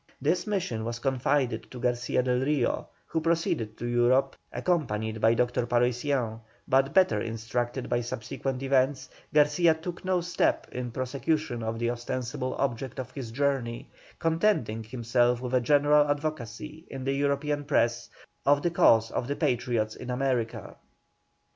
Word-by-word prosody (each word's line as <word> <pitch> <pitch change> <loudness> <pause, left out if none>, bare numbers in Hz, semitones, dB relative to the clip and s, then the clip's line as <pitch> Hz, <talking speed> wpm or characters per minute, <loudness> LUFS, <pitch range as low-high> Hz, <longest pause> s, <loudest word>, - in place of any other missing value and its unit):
This 165 +9 0
mission 175 - -1
was 115 +1 -3
confided 130 -1 0
to 125 - -9
Garcia 120 0 0
del 125 0 +1
Rio, 135 -2 0 0.2
who 160 - -2
proceeded 160 -10 0
to - - -5
Europe 120 +3 +2 0.2
accompanied 110 -11 -1
by 115 +1 +5
Dr. 120 0 0
Paroissiens; 125 -1 0 0.3
but 135 +1 +3
better 165 - +4
instructed 120 +3 -3
by 120 - 0
subsequent 125 +3 -4
events, 135 0 +1 0.2
Garcia 150 +3 +4
took 170 +2 -7
no 185 -1 +1
step 175 0 0
in 125 -1 -4
prosecution 130 +1 -2
of 110 0 -3
the 120 +1 0
ostensible 125 +2 -3
object 130 -1 -2
of 125 -1 -5
his 130 -4 -6
journey, 125 -2 -1 0.3
contenting 165 - +1
himself 120 +1 +1
with 125 0 -5
a 125 - +4
general 145 +3 +4
advocacy 150 0 -4
in 135 -1 -6
the 135 +1 0
European 145 +1 0
press 120 -5 +1 0.3
of 145 +1 +3
the 175 - +1
cause 115 -8 +4
of 120 - -2
the 145 - -1
Patriots 115 -4 0
in 125 - -8
America. 125 -3 -2
130 Hz, 150 wpm, -28 LUFS, 120-145 Hz, 0.3 s, by